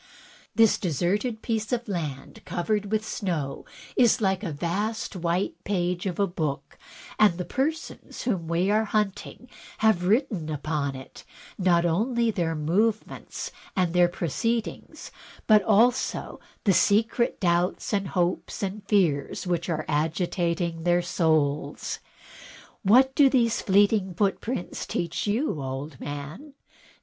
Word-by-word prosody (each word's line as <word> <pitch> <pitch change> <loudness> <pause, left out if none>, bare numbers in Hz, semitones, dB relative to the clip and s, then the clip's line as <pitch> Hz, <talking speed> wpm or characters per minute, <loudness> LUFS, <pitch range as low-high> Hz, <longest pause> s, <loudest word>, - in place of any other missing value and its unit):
This 225 -2 +5
deserted 200 - -1
piece 220 -1 -2
of 245 -1 -1
land 155 -9 -5
covered 205 +3 -2
with 215 0 0
snow 165 -12 -3 0.3
is 240 -3 +4
like 190 -3 +1
a 190 -6 -3
vast 200 +9 -2
white 175 +1 -2
page 180 -2 -1
of 180 - -3
a 200 - +4
book, 150 -7 -4 0.4
and 205 -5 +5
the 180 - -3
persons 305 - -3
whom 190 -9 -1
we 175 +4 +1
are 215 +1 +2
hunting 210 +3 -2 0.3
have 215 -5 +2
written 210 - +1
upon 150 -2 -2
it, 130 0 -11 0.4
not 175 -2 +3
only 230 +7 +1
their 170 -5 -1
movements 205 +9 -1 0.2
and 180 -3 +1
their 175 -1 +5
proceed 220 - -1
ings, - - -10 0.3
but 215 -1 +6
also 225 +5 +2 0.2
the 195 - +4
secret 225 +5 +2
doubts, 175 0 0
hopes, 185 -2 -1
and 200 +2 -3
fears 175 -10 +1
which 175 0 -1
are 155 -2 -2
agitating 170 +2 -1
their 175 +1 +2
souls. 155 -4 0 0.8
What 255 +6 +5
do 280 -1 +6
these 235 -4 +2
fleeting 200 -1 +3
footprints 200 +2 -2
teach 170 +3 -2
you, 210 - 0
old 135 +3 -5
man? 150 - -7
185 Hz, 130 wpm, -26 LUFS, 170-215 Hz, 0.8 s, but